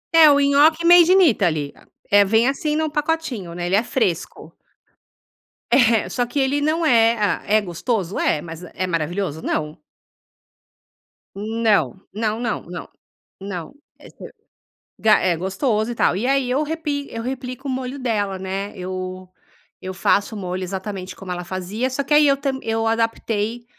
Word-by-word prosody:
É, 320 -2 +9
o 285 -1 +5
nhoque 295 +4 +4
made 345 0 +7
in 380 +1 +6
Italy, 170 - +1 0.4
é, 205 0 +7
vem 220 +4 +3
assim 300 +2 -1
num 315 0 0
pacotinho, 295 - -2
né? 175 0 -4
Ele 180 +2 +1
é 215 - +3
fresco. 220 -8 -2 1.2
É, 230 -4 +4
só 245 - -1
que 245 +4 -3
ele 275 +2 +1
não 315 +3 +1
é 230 -4 +4
ah, 205 -2 0
é 215 +1 +4
gostoso, 190 +1 -3
é, 150 - +1
mas 165 +1 -9
é 185 - -2
maravilhoso, 170 -1 -2
não. 150 -1 -3 1.6
Não 210 - 0
não 215 +1 -2
não 235 -2 -2
não 175 +1 -8 0.5
não, 185 - -6 0.3
eh, - - -14
se - - -11 0.7
ga 215 -1 +5
é 175 - +1
gostoso 210 - -1
e - - -5
tal. 180 - +2
E 205 +6 -2
aí 275 -1 +2
eu 260 +4 +1
repi 295 -2 -3
eu 230 0 -6
replico 255 +1 -5
o - - -1
molho 260 +1 -4
dela, 205 -6 -1
né. 190 +2 -4
Eu 185 0 -6 0.5
eu 185 0 -5
faço 200 +3 +1
o - - -5
molho 185 -1 -4
exatamente 190 0 -5
como 190 -2 -8
ela 180 0 -4
fazia. 190 +7 -3
Só 265 +2 -2
que 295 - -1
aí 295 0 +6
eu 275 0 +3
tam 270 -1 -2
eu 225 0 -1
adaptei, 225 0 -1
220 Hz, 170 wpm, -21 LUFS, 185-265 Hz, 1.6 s, É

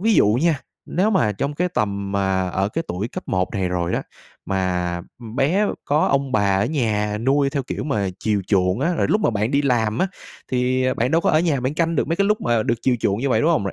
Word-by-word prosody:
ví 220 +2 +3
dụ - - +5 0.2
nha, 165 -5 +2 0.3
nếu 195 +5 +1
mà 115 - +2
trong 140 +8 -3
cái 180 +3 0
tầm 100 - -2
mà 95 -2 0
ở 95 +2 0
cái 165 +8 -3
tuổi 95 +6 -3
cấp - - -8
1 95 -1 0
này 95 -2 0
rồi 90 -1 -1
á, - - -1 0.4
mà, 90 -2 -1 0.2
ừm, 115 0 -9
bé 180 +11 +2 0.2
có 150 +2 +2
ông 140 -1 0
bà 100 -2 +2
ở 115 - +1
nhà 105 -7 0
nuôi 140 +4 +2
theo 140 -1 -1
kiểu - - -5
mà 105 -9 0
chiều 105 -3 0
chuộng 95 +1 +1
á, 170 +5 +1
rồi - - 0
lúc 215 - +2
mà - - +2
bạn 110 +2 -1
đi 140 +1 +2
làm 115 -5 +1
á, 190 - +2 0.5
thì, 130 +1 +1
à, 130 - +1
bạn 125 - 0
đâu 165 +1 +3
có - - +2
ở 155 - +4
nhà 155 -6 +1
bạn 130 +3 -2
canh 165 0 0
được - - 0
mấy 165 - 0
cái 200 - +2
lúc 210 0 +1
mà 120 -2 +1
được 115 - +1
chiều 125 -2 +2
chuộng 100 +1 +1
như 140 - 0
vậy, - - +2
đúng 160 +3 +3
hông? 155 -11 +1
Rồi 100 - -3
125 Hz, 265 wpm, -22 LUFS, 100-150 Hz, 0.5 s, dụ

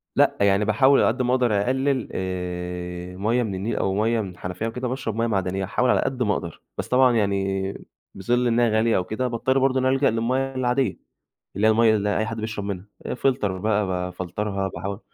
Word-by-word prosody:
لأ، - - +3
يعني 100 +1 +3
باحاول 130 +6 +4
على - - +4
قد 120 +3 0
ما 125 0 +1
أقدر 120 -6 +2
أقلل 130 +2 0
آآ 90 -1 -4
مَيّه 115 +5 +1
من 100 -4 -3
النيل 100 +5 -2
أو 95 - 0
مَيّه 115 +1 +1
من 100 - -5
الحنفية 90 +4 -5
وكده، 125 +2 -3
وباشرب 125 -4 -3
مَيّه 115 +1 +1
معدنيّة، 95 -3 -1
أحاول 125 +6 0
على - - +3
قد 130 -2 -1
ما 105 - +2
أقدر. 85 -4 -5 0.2
بس - - -3
طبعًا 125 -1 +4
يعني 95 -2 0 0.4
بظِل 120 +6 +1
إنها 120 0 +3
غالية 110 +1 +2
أو 90 - 0
كده 110 +7 -2
باضطر 130 +3 +1
برضه 135 0 +2
إن 130 - 0
أنا 130 +1 +3
ألجأ 135 +1 +3
للمَيّه 130 +4 -1
العادية، 125 -3 0 0.6
اللي 105 +2 +3
هي - - +6
المَيّه 110 0 +4
اللي 105 0 0
أي 110 - 0
حد 115 0 -5
بيشرب 110 -2 -4
منها 100 -2 -4 0.2
آآ - - -3
Filter 130 -2 +1
بقى 100 +1 0
بافلترها 95 +2 -3
باحاول 100 +2 -5
110 Hz, 210 wpm, -24 LUFS, 95-125 Hz, 0.6 s, هي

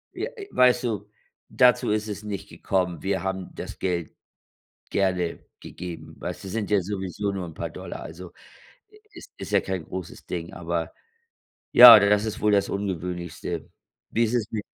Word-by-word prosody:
Ja, - - -2 0.2
weißt 125 0 +4
du, 105 -4 -3 0.4
dazu 125 0 +4
ist 105 0 0
es 105 -1 -5
nicht 100 -1 -5
gekommen. 90 -4 -2
Wir 95 -2 -1
haben 95 -1 -3
das - - -8
Geld 85 -4 -2 0.7
gerne 90 -3 0 0.2
gegeben 90 -2 -8
weißt - - -6
du, - - -7
sind 105 +1 -3
ja 100 -2 +4
sowieso 100 +1 -3
nur 95 -2 -4
'n 80 - -9
paar - - -5
Dollar, - - -8
also 85 +3 -9 0.8
es - - -11
ist - - -7
ja - - +5
kein 95 -4 -4
großes 95 -2 -8
Ding, 85 -1 -5
aber 85 -1 -3 0.8
ja, 120 -3 +12
das 105 +1 +3
ist 110 -1 -4
wohl 105 - +2
das 100 -1 +2
Ungewöhnlichste. 90 -3 -4 0.4
Wie 115 - +2
ist 115 +1 0
es 110 -3 -1
mit 105 -2 -3
95 Hz, 165 wpm, -25 LUFS, 90-105 Hz, 0.8 s, ja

